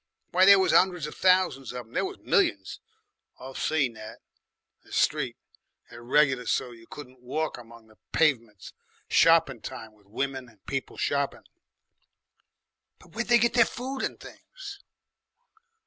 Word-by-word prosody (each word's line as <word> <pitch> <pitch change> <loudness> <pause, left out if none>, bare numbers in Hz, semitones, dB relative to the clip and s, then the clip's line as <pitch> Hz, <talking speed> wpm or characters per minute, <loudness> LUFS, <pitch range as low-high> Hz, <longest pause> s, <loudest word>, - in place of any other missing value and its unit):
Why, 185 +2 +5
there 200 0 +9
was 190 - +2
'undreds 180 -4 +3
of 150 - -7
thousands 180 -9 +2
of 125 -1 -6
them. 115 - -22
There - - 0
was - - -5
millions. 95 -1 0 0.6
I've 130 +1 -8
seen 140 -6 0
that 110 -1 -10 0.7
'I - - -22
Street - - 0 0.5
there 120 - -11
regular 130 0 +2
so's 120 -2 -2
you 115 - -18
couldn't 130 -3 -12
walk 150 +3 -3
along 115 -1 -14
the 110 0 -23
pavements, 115 - 0 0.4
shoppin' 165 -8 +4
time, 110 -1 -8
with 105 -2 -27
women 130 +3 -4
and 110 -4 -26
people 135 -1 -4
shoppin'." 140 -1 -1 1.5
"But 180 - -20
where'd 235 +3 -3
they 240 - +6
get 235 +1 +2
their 235 -1 +6
food 260 +3 -5
and - - -3
things?" 410 -5 -11
135 Hz, 150 wpm, -27 LUFS, 115-180 Hz, 1.5 s, there